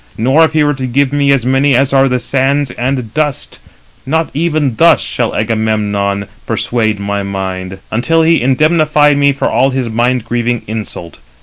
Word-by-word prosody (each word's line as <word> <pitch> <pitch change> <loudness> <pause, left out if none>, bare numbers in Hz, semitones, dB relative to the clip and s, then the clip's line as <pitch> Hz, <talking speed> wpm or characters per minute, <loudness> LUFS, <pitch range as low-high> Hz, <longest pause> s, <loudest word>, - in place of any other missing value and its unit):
Nor 135 +8 +3
if 160 - -4
he 155 -1 +2
were 145 0 +1
to 130 -2 -4
give 140 +2 0
me 140 -1 +2
as 135 -4 +1
many 135 +1 +2
as 135 +2 +1
are 135 0 +4
the 125 - +1
sands 135 +2 0
and 125 -3 -3
dust, 150 -3 -3 0.4
not 160 +4 -1
even 155 -5 -1
thus - - +5
shall - - -3
Agamemnon 105 -2 -1
now 100 - -9 0.2
persuade 110 -3 -1
my 100 0 -2
mind, 95 -1 -5
until 160 +9 +1
he 165 +1 +3
indemnify 150 +2 +3
me 140 0 +3
for 140 - -2
all 135 - +2
his 130 -3 -2
mind 120 +1 0
grieving 120 0 -2
insult. 105 -6 -7
130 Hz, 180 wpm, -13 LUFS, 110-145 Hz, 0.4 s, thus